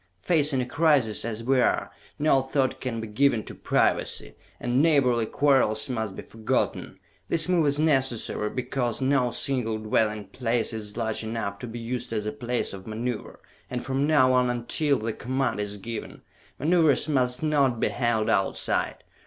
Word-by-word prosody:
"Facing 150 -5 +2
a - - -2
crisis 140 -6 +2
as 115 0 -4
we 130 +1 +3
are, - - +1 0.3
no 145 -3 +3
thought 135 0 -1
can 120 -3 -3
be 110 - -5
given 115 +1 +2
to - - -8
privacy, - - 0 0.3
and 120 +2 +1
neighborly 130 -8 +3
quarrels 135 -7 +2
must 110 -5 -3
be - - -7
forgotten! 110 -1 -2 0.3
This 165 0 +3
move 175 -4 +3
is 145 +1 +2
necessary 135 -8 +1
because 125 -1 -2
no 130 -2 +2
single 120 -3 -1
dwelling 110 -1 0
place 120 -2 -1
is 105 -1 -5
large 110 -1 -2
enough 110 -3 -4
to 125 - -6
be 115 +1 -7
used 120 +1 -4
as 105 -1 -2
a 105 - -1
place 120 -1 -3
of 95 +1 -9
maneuver 115 +2 -4 0.3
and 125 -1 -4
from 135 +2 0
now 130 -5 +4
on 125 -1 +3
until 125 +4 0
the 110 +1 -3
command 130 -1 -2
is 105 0 -3
given, 115 +2 -7 0.3
maneuvers 160 -1 +3
must 130 -2 0
not 140 -6 +2
be - - +1
held 120 -3 0
Outside! 95 - 0
125 Hz, 170 wpm, -26 LUFS, 110-140 Hz, 0.3 s, now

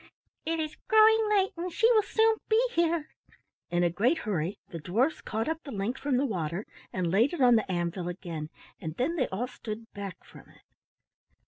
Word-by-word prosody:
"It 330 0 0
is 310 -1 -3
growing 440 -1 +6
late 390 -2 +3
and 350 +1 -4
she 430 - +1
will 440 -2 +5
soon 445 +1 +2
be 440 0 +5
here." 335 -5 0 0.6
In 175 0 +1
a 175 - +2
great 240 - +2
hurry 195 - -2
the 165 - -6
dwarfs 230 - 0
caught 220 +1 -3
up 320 +1 -2
the 285 - -9
link 210 +3 -2
from 280 -3 0
the 275 - +2
water 175 - -3 0.3
and 180 -3 -1
laid 225 - +3
it 345 - -3
on 245 -2 +7
the 215 -4 +1
anvil 175 0 -2
again, 170 -4 -6 0.3
and 160 0 -5
then 295 +7 0
they 260 -7 +1
all 205 +6 -2
stood 225 -2 -8
back 200 -3 -7
from - - -15
it. - - -21
240 Hz, 200 wpm, -29 LUFS, -, 0.6 s, on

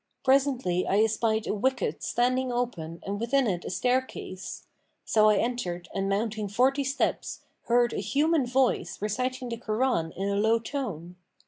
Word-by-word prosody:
Presently 260 -9 +2
I 205 +3 +4
espied 220 0 +1
a - - -1
wicket[FN#510] 255 +5 -1
standing 255 +1 +1
open 175 -10 -3
and 200 +1 -3
within 260 +4 +2
it 180 -5 -1
a - - -3
staircase: 245 -3 -2 0.4
so 215 -1 +4
I 210 - +5
entered 185 -8 -2
and 195 0 -1
mounting 215 +1 -1
forty 260 +7 +2
steps, 275 +1 -1 0.2
heard 240 0 +3
a - - -2
human 285 - +1
voice 245 -7 +1
reciting 250 +4 -2
the 230 - -4
Koran 220 -7 0
in 195 +2 -3
a 200 0 0
low 220 +2 +3
tone. 205 - -5
230 Hz, 155 wpm, -27 LUFS, 200-255 Hz, 0.4 s, I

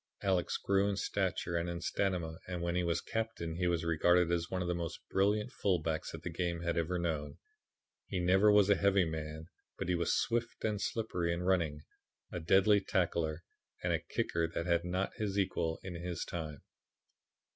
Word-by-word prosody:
Alex 95 -3 +1
grew 100 +1 +2
in 100 - 0
stature 95 -3 -1
and 85 +1 0
in 85 0 -3
stamina 85 -3 -1
and 90 -1 -3
when 85 0 0
he 90 0 +1
was 85 0 0
captain 110 -8 -3
he 90 0 +1
was 85 -1 0
regarded 85 +1 +3
as 85 0 0
one 95 - -2
of - - -3
the 90 - +1
most 85 -1 -4
brilliant 105 +2 +2
fullbacks 80 -5 0
that 80 0 -8
the - - -3
game 85 0 -2
had 85 -1 -1
ever 85 +2 0
known. 75 -4 -2 0.7
He - - -3
never 95 +4 +5
was 105 -2 +6
a - - +7
heavy 100 -2 +3
man, 80 0 -5 0.3
but - - -3
he - - +3
was 85 -1 +1
swift 115 -1 -1
and 105 -2 0
slippery 90 -6 -1
in 85 +1 -2
running, 85 -5 +1 0.5
a - - -3
deadly 95 +5 +5
tackler, 85 -4 0 0.4
and - - +1
a - - +1
kicker 85 -1 -1
that 85 0 -3
had 85 -1 +2
not 90 +2 -1
his 100 -2 -2
equal 80 -4 0
in 95 - -5
his 85 0 -4
time. 80 -4 -5
85 Hz, 190 wpm, -33 LUFS, 85-95 Hz, 0.7 s, a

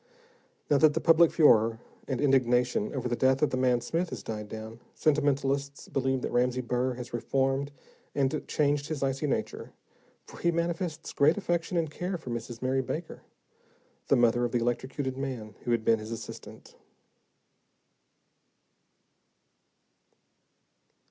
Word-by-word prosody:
Now 145 - +5
that 155 0 +5
the - - +2
public 165 0 +5
furor 115 -7 +4 0.3
and 130 -3 -2
indignation 125 -5 +2
over - - -2
the 120 - 0
death 130 +3 +2
of 150 - +2
the - - 0
man 125 -2 +2
Smith 165 +7 -2
has - - -7
died 105 -1 -5
down, 110 +1 -8 0.2
sentimentalists 140 -2 0
believe 130 -1 0
that - - -2
Ramsey 125 +1 +1
Burr 125 +1 -1
has 125 0 -8
reformed 135 +3 0 0.4
and 140 +2 0
changed 145 -1 +1
his 155 -3 -3
icy 135 +2 -1
nature, - - -3 0.5
for - - -13
he 170 - +2
manifests 170 -1 -2
great 150 +5 +4
affection 175 -3 -1
and 160 -3 0
care 180 +4 -3
for 130 -7 -8
Mrs. 120 +1 -6
Mary 130 +1 +1
Baker, 160 +6 -5 0.9
the - - +4
mother 120 0 +3
of 120 - 0
the - - +3
electrocuted 130 +3 -2
man 125 -6 -5
who 120 - 0
had 115 -1 +1
been 115 -1 +4
his 110 0 -8
assistant. 115 -1 -9
135 Hz, 145 wpm, -28 LUFS, 120-150 Hz, 0.9 s, Now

